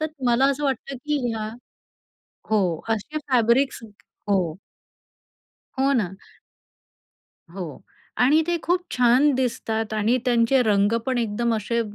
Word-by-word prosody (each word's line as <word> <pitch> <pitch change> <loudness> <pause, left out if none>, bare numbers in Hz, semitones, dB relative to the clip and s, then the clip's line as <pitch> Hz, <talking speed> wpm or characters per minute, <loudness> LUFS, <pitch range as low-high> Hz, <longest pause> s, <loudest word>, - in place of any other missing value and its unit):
तर 310 - 0 0.2
मला 240 +3 +4
असं 290 +1 -3
वाटतं, 270 0 -2
की 300 +3 -2
ह्या 220 -1 -3 1.0
हो, 185 -7 +1
असे 225 +8 -2
फॅब्रिक्स 250 +2 +2 0.5
हो. 180 -4 +1 1.2
हो 275 +1 +3
ना. 200 -8 0 1.4
हो 175 -5 -7 0.4
आणि 300 +6 +5
ते 345 0 +1
खूप 355 +2 +1
छान 250 +4 +4
दिसतात 225 -3 -2
आणि 215 +3 +2
त्यांचे 245 +1 +3
रंग 205 -1 +2
पण 255 -2 0
एकदम 230 +1 0
असे 225 +2 -1
235 Hz, 120 wpm, -23 LUFS, 215-270 Hz, 1.4 s, आणि